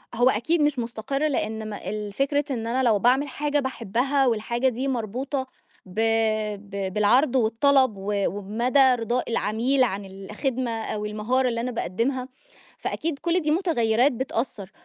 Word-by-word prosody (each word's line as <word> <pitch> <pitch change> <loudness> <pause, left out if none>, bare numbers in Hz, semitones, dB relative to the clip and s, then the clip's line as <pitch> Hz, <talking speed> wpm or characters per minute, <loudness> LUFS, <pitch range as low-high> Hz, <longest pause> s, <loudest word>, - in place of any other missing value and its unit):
هو 245 +2 +4
أكيد 300 +9 +1
مش 295 -3 +2
مستقِر 240 +5 -2
لأن 220 -5 -2
م 210 - -6
الفكرة 215 +9 -2
إن 230 -3 -3
أنا 255 +3 0
لو 220 -4 +3
باعمل 255 +7 +3
حاجة 290 +2 -1
باحبها، 265 +2 0
والحاجة 235 +2 0
دي 255 +3 -3
مربوطة 260 +3 -2 0.4
ب 190 +3 -7 0.7
ب 195 -1 -4
بالعرض 240 +6 +3
والطلب، 260 +1 +3
و 195 +2 -3
وبمدى 220 +7 0 0.2
رضاء 235 +1 -2
العميل 235 +5 +1
عن 200 -4 -2
الخدمة 215 +6 -3
أو 220 -2 -3
المهارة 225 +5 0
اللي 230 -1 -2
أنا 250 +1 -2
باقدّمها، 245 +5 -2 0.5
فأكيد 315 -3 -3
كل 345 +1 +1
دي 305 -1 0
متغيّرات 265 - +2
بتأثّر، 230 -6 -4
240 Hz, 145 wpm, -25 LUFS, 215-270 Hz, 0.7 s, هو